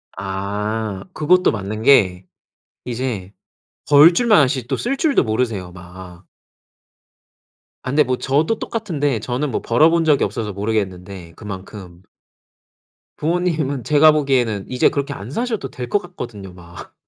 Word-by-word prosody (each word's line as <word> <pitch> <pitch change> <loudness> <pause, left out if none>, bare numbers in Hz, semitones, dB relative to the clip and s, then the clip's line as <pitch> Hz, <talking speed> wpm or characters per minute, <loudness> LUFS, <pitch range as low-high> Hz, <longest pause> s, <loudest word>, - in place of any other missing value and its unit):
아. 100 +2 -4
그것도 180 +4 +3
맞는 105 +1 -5
게 95 -9 +4 0.6
이제 120 -6 -4 0.6
벌 150 +4 +7
줄만 215 -4 +4
아시지 130 -2 -2
또 130 - -1
쓸 245 +3 -2
줄도 305 -3 +2
모르세요, 110 -5 -2
막. 90 0 -12 1.6
아 - - -5
근데 150 +1 +4
뭐 130 -1 -1
저도 150 +11 0
똑같은데 150 - -2
저는 125 +6 -3
뭐 - - -2
벌어 150 +8 +4
본 165 0 +2
적이 150 -3 +3
없어서 110 -4 -3
모르겠는데 95 -4 -4
그만큼 95 -3 -9 1.2
부모님은 155 -5 -1
제가 155 +1 +5
보기에는 125 -9 0
이제 125 -1 +3
그렇게 140 0 -3
안 110 +1 -9
사셔도 225 - -3
될 125 -1 -7
것 205 - +2
같거든요 120 - -9
막. 85 -2 -13
120 Hz, 280 characters per minute, -19 LUFS, 100-150 Hz, 1.6 s, 벌